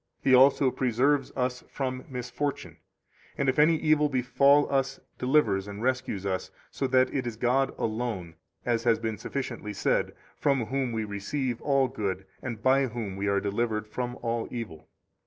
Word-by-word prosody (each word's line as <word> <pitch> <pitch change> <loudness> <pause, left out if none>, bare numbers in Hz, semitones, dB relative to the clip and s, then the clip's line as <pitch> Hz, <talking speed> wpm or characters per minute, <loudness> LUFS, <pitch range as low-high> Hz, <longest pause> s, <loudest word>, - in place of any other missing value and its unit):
He 130 - +4
also 135 +1 +6
preserves 130 +4 +1
us 125 -1 -1
from 130 -2 -3
misfortune, 125 +3 -4 0.6
and 140 - 0
if 130 +2 +2
any 160 +2 +6
evil 155 -1 +3
befall 140 +2 +4
us, 135 0 0 0.2
delivers 115 -8 +2
and 100 +2 -7
rescues 125 -6 -1
us, 95 -1 -2 0.2
so 135 - -1
that 130 0 +3
it 130 -3 -1
is 115 - -4
God 125 +4 +1
alone 110 -7 -3 0.3
(as 115 -1 +1
has 115 -1 +4
been 110 -3 -3
sufficiently 120 -4 -4
said) - - 0 0.2
from 135 -5 +1
whom 130 +1 -1
we 110 -1 -1
receive 115 +5 -3
all 135 -2 +2
good, 95 -5 -3 0.2
and 115 -4 -6
by 135 +1 +4
whom 110 -4 -5
25 - - -8
we 100 - -1
are 100 0 +2
delivered 105 +2 -1
from 125 +3 -4
all 115 -1 -1
evil. 85 -11 -7
125 Hz, 170 wpm, -28 LUFS, 110-135 Hz, 0.6 s, also